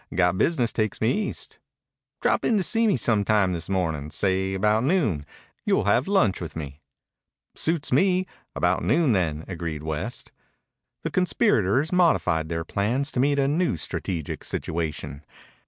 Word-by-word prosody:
Got 90 0 +2
business 125 -9 +1
takes 110 -3 -1
me 110 +2 +2 0.2
East." - - -8 0.6
"Drop - - +2
in 225 - +2
to 195 - +1
see 225 +4 +2
me 205 - +3
some 110 -3 +2
time 100 -3 +2
this 85 +1 -5
morning. 80 -6 -1
Say 95 +4 0
about 105 +3 +2
noon. 125 - +1 0.4
You'll - - +2
have 105 +7 +2
lunch 125 - +2
with 80 -4 -6
me." 75 -1 -7 0.7
"Suits 155 -4 -1
me. 185 -1 +3 0.3
About 90 +1 +1
noon, 155 -3 +3
then," 80 -6 0
agreed 85 -4 -5
West. 80 -1 -5 0.7
The - - -3
conspirators 140 - +2
modified 160 - +2
their 80 -1 -3
plans 120 - -1
to - - -2
meet 140 +2 +2
a 135 -1 +2
new 155 - +1
strategic 80 +1 -4
situation. 75 -3 -4
100 Hz, 155 wpm, -25 LUFS, -, 0.7 s, me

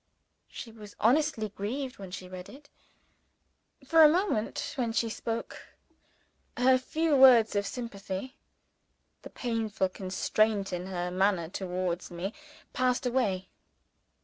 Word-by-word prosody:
She 230 - -8
was 210 -2 -12
honestly 240 -2 +2
grieved 250 +7 -5
when 195 -2 -8
she 180 0 -7
read 185 0 -9
it. 285 +2 -14 1.2
For 325 +4 +5
a 305 - +10
moment 335 - -1
when 235 -4 -1
she 230 0 +1
spoke 230 +1 -5 0.9
her 255 +1 +5
few 315 +4 0
words 250 -5 +7
of 200 0 0
sympathy 230 +1 -6 0.9
the - - -10
painful 220 -5 -2
constraint 195 +2 0
in 180 +1 -4
her 180 -1 -3
manner 185 -3 +1
towards 180 -2 -3
me 180 +4 -5 0.4
passed 255 0 +1
away. 210 -7 0
220 Hz, 120 wpm, -29 LUFS, 190-255 Hz, 1.2 s, a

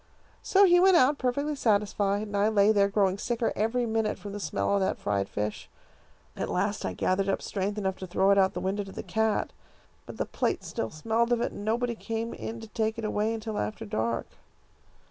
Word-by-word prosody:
So 400 +1 +5
he 355 -1 +6
went 375 -1 +6
out 285 0 +4
perfectly 285 +4 -1
satisfied, 205 -3 +1
and 205 -1 -6
I 200 +1 +3
lay 210 -1 +4
there, 200 -2 +4
growing 200 -1 +1
sicker 235 0 -1
every 225 +3 0
minute 220 -1 0
from 205 - -8
the 205 - -5
smell 200 - -1
of 200 - +3
that 190 - 0
fried 100 -1 -1
fish. 105 0 -4 0.7
At - - -3
last - - -1
I 95 - -2
gathered 185 - 0
up 195 - +1
strength 200 +1 -2
enough 190 -2 -1
to 185 - -7
throw 190 +3 +3
it 200 - +4
out 190 - +6
of 190 - -5
the - - -4
window 195 +2 -1
to 195 - -10
the - - -7
cat, 220 -1 0 0.5
but - - -9
the - - -1
plate - - -1
still 110 - -3
smelled 225 - 0
of 240 - +3
it, - - -1
and 205 - -8
nobody 235 +3 0
came 225 0 -4
in 230 +1 -6
to 225 - -9
take 220 +1 -1
it 225 - -4
away 215 +1 0
until 220 -1 -4
after 105 +1 -3
dark. 115 +2 -1
210 Hz, 225 wpm, -28 LUFS, 195-230 Hz, 0.7 s, he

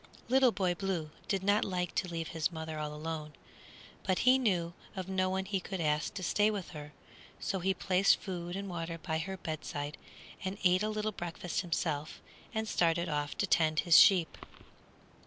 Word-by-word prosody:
Little 260 -1 +5
Boy 185 -3 +1
Blue 175 -5 -3 0.2
did 195 -2 0
not 205 +2 +3
like 180 -3 -2
to 185 - 0
leave 165 -2 -4
his 160 +1 -1
mother 160 -1 -5
all 150 -1 -3
alone, 155 0 -5 0.7
but 185 -1 0
he 255 +1 +7
knew 175 -8 +1 0.2
of 185 -1 -4
no 185 -1 +1
one 190 0 -1
he 195 0 -1
could 190 +1 -5
ask 150 +1 0
to 190 - -4
stay 205 +4 +3
with 205 -4 -4
her; 150 -3 -8 0.5
so 190 - -2
he 190 +2 +1
placed 190 +1 +3
food 175 -2 -5
and 200 0 -4
water 165 -2 -4
by 160 -1 -2
her 190 +4 -4
bedside, 155 -3 -5 0.4
and 190 +1 -3
ate 180 0 +4
a 215 - 0
little 215 0 -1
breakfast 175 -2 -3
himself, 160 -4 -2 0.3
and 220 -1 -2
started 170 -2 +2
off 145 -1 -2
to - - +1
tend 160 -4 +3
his 170 -2 +7
sheep. 180 -5 +5
180 Hz, 185 wpm, -32 LUFS, 160-195 Hz, 0.7 s, he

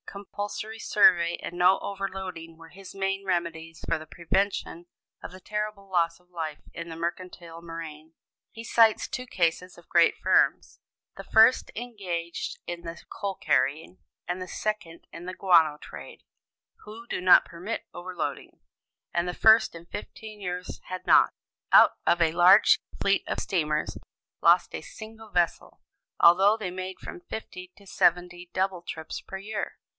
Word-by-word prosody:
Compulsory 205 +2 -6
survey 175 -6 +4
and 175 - -7
no 180 +2 +5
overloading 190 -4 -6
were 165 0 -14
his 190 +2 -12
main 195 0 -2
remedies 170 -3 -3
for - - +1
the 155 0 -11
prevention 175 0 -2 0.4
of - - -7
the 185 - -12
terrible 210 0 -4
loss 170 -2 +1
of 180 0 -31
life 160 -3 -5
in 170 0 -7
the 165 - -7
mercantile 170 -1 -6
marine. 165 -2 -9 0.4
He 225 - -9
cites 225 -1 +3
two 255 - -5
cases 180 -3 -1
of 175 - -17
great 170 -1 +4
firms - - +1 0.4
the - - -9
first 225 +3 +4
engaged 185 -8 -5
in 175 0 -5
the 170 0 -8
coal 200 -1 -4
carrying, 145 +6 0 0.3
and 180 +1 -3
the 185 - -6
second 210 -6 -4
in 170 +2 -9
the 185 - -4
guano 165 -6 +4
trade - - -11 0.6
who 220 +2 -11
do - - -3
not 185 0 +7
permit 180 +7 -6
overloading, 180 -1 -6 0.5
and 170 +1 0
the 180 - -4
first, 220 -2 +5
in 165 0 -10
fifteen 210 +2 -9
years 180 -1 -5
had 185 0 -7
not, - - +6 0.4
out - - +7
of 175 - +3
a 160 -1 +3
large 180 +5 +6 0.2
fleet 200 0 +2
of - - -2
steamers, 155 -4 -1 0.4
lost - - +4
a - - -5
single 220 0 -11
vessel, 175 -4 -1 0.4
although 195 +5 +6
they 195 -5 -4
made 185 +1 -6
from 355 - -9
fifty 185 - -8
to 200 - -18
seventy 175 -1 0
double 185 -1 -1
trips 160 -2 -7
per 190 - -8
year. 210 +3 -5
180 Hz, 155 wpm, -27 LUFS, 170-200 Hz, 0.6 s, not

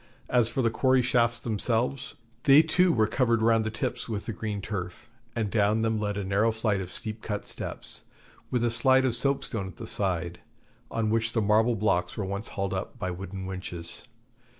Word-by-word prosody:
As 120 -3 +4
for 130 - -1
the 115 - +2
quarry 130 +2 +3
shafts 120 -1 +2
themselves, 120 +3 -1 0.3
they 140 +3 +8
too 180 +3 +3
were 110 -6 +3
covered 115 -1 +1
round 115 -1 +4
the 110 - -1
tips 110 +2 -3
with 105 -2 -3
the 115 - -3
green 105 0 -4
turf, 95 -3 -5 0.3
and 110 -3 -1
down 105 0 +2
them 110 -1 +1
led 105 -1 -2
a 100 - -2
narrow 100 +4 +2
flight 110 -3 0
of 90 -1 -7
steep 110 +3 -5
cut 105 -2 -4
steps, - - -3 0.4
with 125 -2 0
a 120 - +2
slide 130 +3 +4
of 125 -3 +2
soap 140 +3 +2
stone 100 -5 -3
at 95 - -10
the 115 - -7
side, 90 -5 -2 0.5
on 110 -1 -1
which 115 0 +1
the 115 - +1
marble 110 +3 +3
blocks 90 -4 0
were 105 - -2
once 100 +3 -3
hauled 95 -1 -3
up 95 +6 -4
by 90 -6 -3
wooden 95 +1 -6
winches. 90 -1 -7
110 Hz, 200 wpm, -27 LUFS, 100-120 Hz, 0.5 s, they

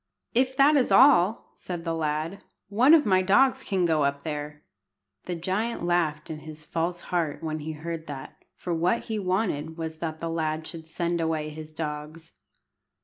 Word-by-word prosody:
"If 260 +2 +2
that 290 +2 +6
is 260 - +2
all," 235 -6 +5
said 175 -2 -7
the 165 - -1
lad, 160 +3 -2 0.3
"one 250 +10 +6
of 305 - +3
my 185 -3 +4
dogs 235 +8 +4
can 185 -3 0
go 160 -3 +2
up 140 0 -1
there." 150 -1 -5 0.6
The 180 - -3
giant 190 +5 -2
laughed 165 -4 0
in 155 - -6
his 155 0 -9
false 170 +2 -2
heart 165 -4 -1
when 155 -1 -2
he 155 +1 -5
heard 165 +1 -6
that, 135 -2 -9
for 175 - -4
what 175 +7 +1
he 220 -1 -3
wanted 180 -5 -1
was 160 -1 -5
that 160 -1 -4
the 165 0 -3
lad 155 -1 -2
should 160 -1 -8
send 170 +1 -1
away 160 -2 -1
his 155 0 -9
dogs. 155 +1 -6
165 Hz, 180 wpm, -26 LUFS, 155-185 Hz, 0.6 s, that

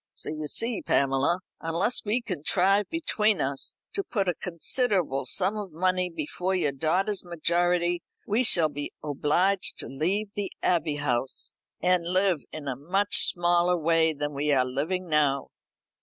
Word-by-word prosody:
So - - -3
you 155 -1 -4
see, 230 +7 +1
Pamela, 140 +6 +1 0.2
unless 170 +9 0
we 225 +4 +1
contrive 190 +2 +1
between 220 - +1
us 135 0 -1 0.2
to 395 - -2
put 205 - -1
by 180 - +2
a 170 - -12
considerable 175 - -1
sum 200 - 0
of 205 -4 -6
money 185 +2 +1
before 175 +3 -3
your 150 -6 +1
daughter's 180 +8 0
majority, 175 0 0 0.2
we 220 +5 +1
shall 170 -9 +4
be 145 0 -6
obliged 155 +7 +1
to - - -7
leave 195 +9 -2
the 205 -2 -4
Abbey 165 -4 +1
House, 130 -3 -2 0.3
and 180 -1 +3
live 185 -3 +2
in 150 -2 -7
a 130 - -2
much 195 +9 +2
smaller 175 0 +2
way 165 0 +3
than 145 -1 -4
we 145 +2 -1
are 130 -2 +3
living 160 +9 -2
now." 145 -3 +1
175 Hz, 155 wpm, -27 LUFS, 150-195 Hz, 0.3 s, shall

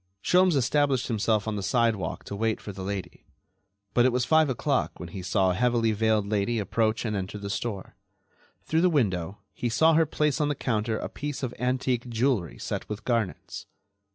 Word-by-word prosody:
Sholmes 180 -2 +4
established 135 0 +1
himself 110 -1 +1
on 105 -1 -2
the - - -3
sidewalk 110 -4 0
to 100 - -6
wait 110 +1 0
for 105 - -7
the 95 0 -8
lady, 95 0 -5 0.7
but 120 - +4
it 130 - +4
was 125 0 0
five 160 -2 +4
o'clock 135 +1 -1
when 85 - -7
he 95 +2 -7
saw 95 0 +2
a - - 0
heavily 120 +2 +2
veiled 110 -1 +1
lady 105 +2 0
approach 110 +3 0
and 105 -2 -1
enter 95 +1 -4
the 100 -1 -5
store. 100 -2 -4 0.7
Through 160 - +1
the 180 - +4
window 100 - 0 0.2
he 120 - -2
saw 160 +8 +4
her 160 0 +4
place 150 0 0
on 150 - +2
the 145 - 0
counter 110 -3 -1
a - - -4
piece 145 -2 -5
of 125 -2 -2
antique 125 -1 -1
jewelry 115 - 0
set - - -5
with 105 0 -6
garnets. 115 -6 -2
115 Hz, 195 wpm, -27 LUFS, 100-130 Hz, 0.7 s, Sholmes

